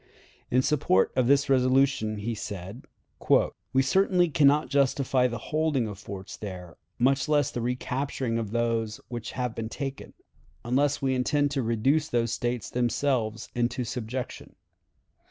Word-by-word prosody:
In 130 +1 +3
support 130 -11 +2
of 130 -2 +2
this 140 +1 +4
resolution 130 -4 +2
he 110 +3 -3
said: 100 +1 -7 0.9
"We 135 0 +3
certainly 180 +1 +3
can 145 -2 +4
not 150 +2 +3
justify 135 -2 +2
the 120 -1 -4
holding 150 -1 0
of 100 -2 -7
forts 100 -3 -8
there, 90 -5 -8 0.2
much 135 +4 +2
less 145 -3 +2
the 120 - -3
recapturing 125 0 -2
of 110 -3 -3
those 115 -1 -1
which 120 -1 -6
have 125 -2 -2
been 110 -1 -5
taken, 135 +2 -6 0.5
unless 140 +4 +1
we 135 -1 +2
intend 145 +3 +1
to 135 - 0
reduce 130 +7 +1
those 120 -5 0
States 120 -1 -2
themselves 120 -2 0
into 120 +1 -1
subjection. 120 +1 -5
125 Hz, 145 wpm, -27 LUFS, 115-140 Hz, 0.9 s, this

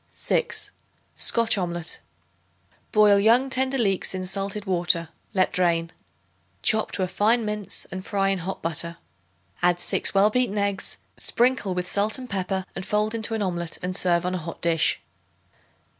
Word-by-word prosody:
6. - - -1 0.4
Scotch 230 -3 +2
Omelet. 170 -2 -3 0.9
Boil 210 -1 +6
young 240 +6 +4
tender 265 +1 +1
leeks 195 -5 0
in 185 0 -3
salted 195 +2 -3
water; 175 -3 +1 0.3
let 185 -1 +2
drain. 170 -2 +1 0.7
Chop 220 -1 +2
to 190 - -1
a - - 0
fine 220 +5 +2
mince 210 -1 -3
and 185 0 -5
fry 195 -1 0
in 195 -1 0
hot 185 +3 -5
butter. 170 +1 -3 0.6
Add 175 0 +3
6 175 - +1
well 200 +2 +5
beaten 245 -3 +1
eggs, 200 -1 -1 0.2
sprinkle 240 -6 +1
with 180 0 -2
salt 205 +5 +2
and 255 -1 -8
pepper 190 -2 -2
and - - -4
fold 210 +3 0
into 225 0 -1
an 215 - -1
omelet 170 -3 -3
and 180 0 -1
serve 175 -2 +3
on 180 - -1
a 185 - -1
hot 165 0 -7
dish. 165 -2 +2
195 Hz, 160 wpm, -25 LUFS, 180-215 Hz, 0.9 s, Boil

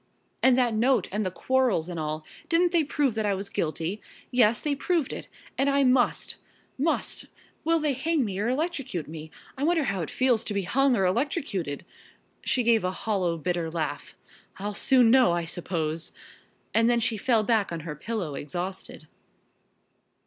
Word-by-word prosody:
"And 260 -1 +5
that 245 -3 +2
note, 235 -1 +2
and 210 +2 -1
the 185 - -1
quarrels, 245 -4 +1
and 175 -2 -5
all. 155 0 -3 0.2
Didn't 345 +1 +3
they 340 -3 +3
prove 285 -3 0
that 220 0 -1
I 200 - +1
was 195 +1 -5
guilty? 165 +5 -2 0.3
Yes, 230 -3 +4
they 295 - -1
proved 310 0 0
it, - - -7 0.3
and 275 +1 +3
I 280 0 +3
must 255 -1 +2 0.4
must 305 +5 -1 0.4
Will 330 +1 +3
they 300 -3 +1
hang 290 +1 0
me 195 -2 -3
or 215 +3 0
electrocute 265 - -2
me? 160 0 -8 0.3
I - - -1
wonder 330 0 +3
how 195 -8 -1
it 160 - -4
feels 250 -4 +2
to 210 - -3
be 200 - 0
hung 270 +7 +3
or 190 - +2
electrocuted?" 195 - -1 0.6
She 250 - +1
gave 230 -2 +4
a 180 - +1
hollow, 185 -3 -1
bitter 170 0 -2
laugh. 155 -3 -4 0.4
"I'll 205 +2 -4
soon 245 +2 +4
know, 255 -7 +5
I 170 -1 -1
suppose!" 165 -2 -3 0.6
And 230 +1 +4
then 240 -1 +3
she 230 -1 +1
fell 225 +1 +2
back 220 -4 +1
on 165 -1 -4
her 155 -1 -6
pillow 180 -1 -4
exhausted. 175 +7 -6
220 Hz, 180 wpm, -27 LUFS, 175-265 Hz, 0.6 s, And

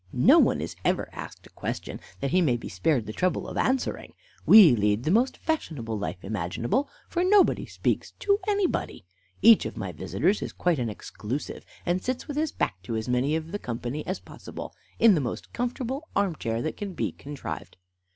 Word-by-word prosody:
No - - +6
one - - +3
is - - -5
ever - - 0
asked - - -9
a - - -16
question, - - -5 0.2
that 140 -1 -1
he 185 - +4
may 130 -8 +2
be - - -8
spared 115 - 0
the 110 - -6
trouble 185 +7 0
of - - -7
answering. 260 +1 -1 0.3
We 190 - +9
lead 105 +1 +1
the 155 - +1
most 240 +6 +2
fashionable 150 - -2
life 100 -3 -4
imaginable, 105 - -1 0.2
for 350 - 0
nobody 390 +2 +4
speaks - - -1
to 400 0 +2
anybody. 405 - -1 0.4
Each 225 0 +8
of - - -9
my 95 -4 -4
visitors 110 - 0
is - - -5
quite 175 -5 +1
an 120 -2 -1
exclusive, 110 +5 -6 0.2
and 175 +1 +1
sits 255 +3 -3
with 290 - -5
his 310 0 0
back 90 - -2
to 115 +5 -4
as 110 +1 -3
many 125 +5 +1
of 160 0 -4
the 205 - -3
company 125 - -4
as 185 - -2
possible, - - -9 0.2
in 230 -2 +7
the 160 - +2
most 120 - -5
comfortable 255 +5 -3
arm 200 -4 +1
chair 115 -3 -2
that 155 - -3
can 200 -2 -5
be - - -2
contrived. 145 0 -7
155 Hz, 195 wpm, -27 LUFS, -, 0.4 s, We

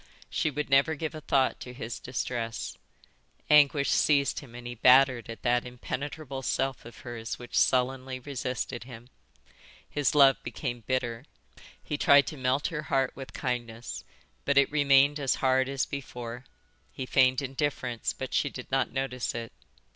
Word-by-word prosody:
She 155 - +1
would 150 +1 -3
never 140 +4 +4
give 155 +1 -4
a 155 - -7
thought 135 -2 +1
to 125 - -8
his 120 -2 -6
distress. 120 -2 -4 0.8
Anguish 145 -1 +5
seized 140 -2 +3
him 125 -5 -13
and 120 0 -9
he 120 - -5
battered 125 0 +5
at 115 - -8
that 120 0 +2
impenetrable 135 +3 -5
self 135 -1 -1
of 115 - -12
hers 115 -2 -6
which 120 - -9
sullenly 130 0 +1
resisted 130 -3 -4
him. 120 -1 -11 0.8
His 145 0 0
love 135 -2 +6
became 120 -4 -5
bitter. 125 -1 -2 0.6
He 150 - -4
tried 140 0 +6
to - - -6
melt 130 +1 0
her 160 -3 -4
heart 135 -1 +2
with 135 -1 -9
kindness, 120 -3 -4 0.4
but 140 0 +1
it 140 0 +5
remained 145 0 +4
as 135 -2 +1
hard 130 0 +2
as 135 -1 0
before; 125 -3 -7 0.5
he 130 - -5
feigned 130 +1 +3
indifference, 130 -3 -2
but 130 - -7
she 145 - +2
did 125 -2 -9
not 135 0 +1
notice 130 -3 -3
it. 115 -1 -6
130 Hz, 160 wpm, -28 LUFS, 125-140 Hz, 0.8 s, love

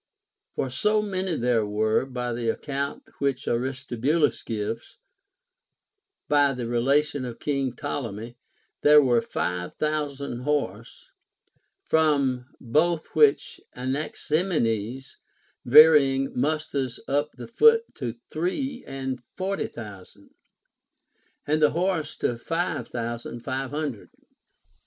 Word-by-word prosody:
For 130 - -2
so 210 +10 +2
many 190 -4 -2
there 120 -4 +2
were, 110 +4 +1
by 125 -2 -3
the 115 -1 -1
account 140 +3 -3 0.2
which 135 -2 -1
Aristobulus 130 +4 0
gives; 115 +1 -4 1.3
by 145 -1 +4
the 125 -2 -4
relation 135 +4 +1
of 120 -2 -6
King 135 -4 -1
Ptolemy, 120 -5 -5 0.5
there 150 0 +8
were 125 -5 +4
five 90 -4 -3
thousand 145 -4 -2
horse; 125 -6 -3 0.7
from 140 -6 +2
both 155 +6 0
which 150 -3 +3
Anaximenes 135 - -1 0.5
varying 135 -1 +7
musters 140 -2 -1
up 145 +2 0
the - - -9
foot 455 - +5
to 125 -5 -4 0.2
three 245 - -2
and 135 -2 -4 0.2
forty 195 +1 -1
thousand, 100 -2 -11 1.1
and 155 +1 +1
the 150 - +6
horse 175 -4 0
to 120 -1 -1
five 165 +7 -2
thousand 120 0 -5
five 135 +1 -3
hundred. 145 -6 -4
135 Hz, 105 wpm, -26 LUFS, 120-155 Hz, 1.3 s, there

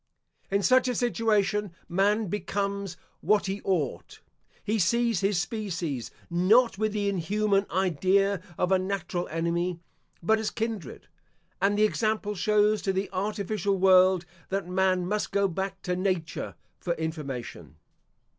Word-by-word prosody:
In 200 +1 +1
such 255 +2 +4
a 250 - 0
situation 210 -4 +1
man 205 +5 +2
becomes 200 -1 -3 0.2
what 205 +4 +2
he 195 +1 -3
ought. 165 -9 -2 0.4
He 215 +1 0
sees 235 +3 +2
his 195 -2 +1
species, 175 - -3 0.2
not 195 +6 +3
with 215 0 +1
the 205 -1 -1
inhuman 200 +2 +1
idea 190 +2 +2 0.2
of 180 +1 0
a 190 - +4
natural 185 -2 -3
enemy, 170 +2 -1 0.4
but 220 +5 +3
as 220 - -1
kindred; 220 - -5 0.5
and 200 +1 +2
the 210 - +4
example 215 -1 0
shows 210 +2 +2
to 195 - 0
the 190 +1 -2
artificial 200 0 -1
world, 185 -1 +5 0.2
that 195 -2 -2
man 185 0 +1
must 210 +3 -2
go 200 0 +2
back 190 +1 -4
to 180 -1 -1
Nature 185 -3 -2 0.2
for 175 - -1
information. 145 - -5
195 Hz, 135 wpm, -27 LUFS, 180-210 Hz, 0.5 s, world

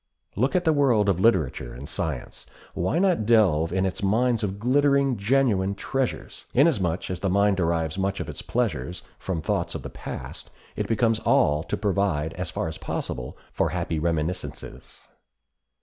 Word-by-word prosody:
Look 130 - +1
at 180 - +3
the 160 -2 +3
world 120 -8 +3
of 90 -3 +1
literature 75 - +1
and 70 +4 -8
science. 75 -6 -4 0.3
Why 90 - 0
not 180 - +2
delve 90 -9 +4
in 95 +1 +1
its 95 - -3
mines 115 +3 +2
of 100 -1 -2
glittering, 140 +3 +3
genuine 100 -3 +2
treasures? 135 +5 -3
Inasmuch 100 - +2
as 90 - -3
the 95 - 0
mind 100 +1 +3
derives 85 -1 0
much 95 0 -1
of - - -4
its - - -6
pleasures 80 +8 -2 0.2
from 85 -5 -3
thoughts - - -1
of - - -5
the - - -7
past - - -7 0.3
it - - -2
becomes 115 0 +2
all 75 -7 +3
to - - -3
provide, 95 -7 0
as 90 +1 -4
far 90 - -3
as 80 0 -6
possible, 60 0 -4 0.2
for - - +1
happy 80 - -2
reminiscences. 85 +2 -4
95 Hz, 165 wpm, -25 LUFS, 85-115 Hz, 0.3 s, delve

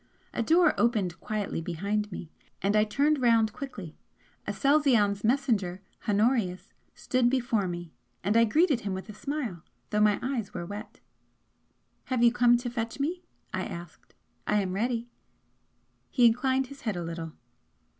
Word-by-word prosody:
A - - -1
door 330 +7 +4
opened 210 -8 +1
quietly 210 -5 -3
behind 200 +5 -2
me, 170 -2 -7 0.3
and 200 +2 +1
I 210 - +5
turned 285 +6 +1
round 225 -3 +4
quickly. 205 - -7 0.5
Aselzion's 255 -9 +3
messenger, 215 -7 +1 0.3
Honorius, 205 -3 +1 0.2
stood 255 -1 +1
before 240 -6 +1
me 175 -2 -6 0.3
and 205 +4 +1
I 230 0 +6
greeted 295 - +3
him 200 -4 -3
with 190 +4 -7
a - - -6
smile, 245 - -4 0.3
though 210 0 +2
my 210 -1 +4
eyes 250 -5 -3
were 175 -1 -3
wet. 210 +3 -8 1.0
"Have 255 -2 0
you 235 - +7
come 245 0 +5
to 245 0 -4
fetch 230 +1 -4
me?" 335 +6 -1 0.3
I - - -1
asked 170 -2 -9 0.3
"I 210 - +3
am 185 -1 -3
ready." 235 +3 -1 1.0
He 245 -3 +4
inclined 260 +3 +3
his 275 +1 -12
head 215 -5 -2
a 175 - -3
little. 165 -1 -5
225 Hz, 155 wpm, -28 LUFS, 195-255 Hz, 1.0 s, you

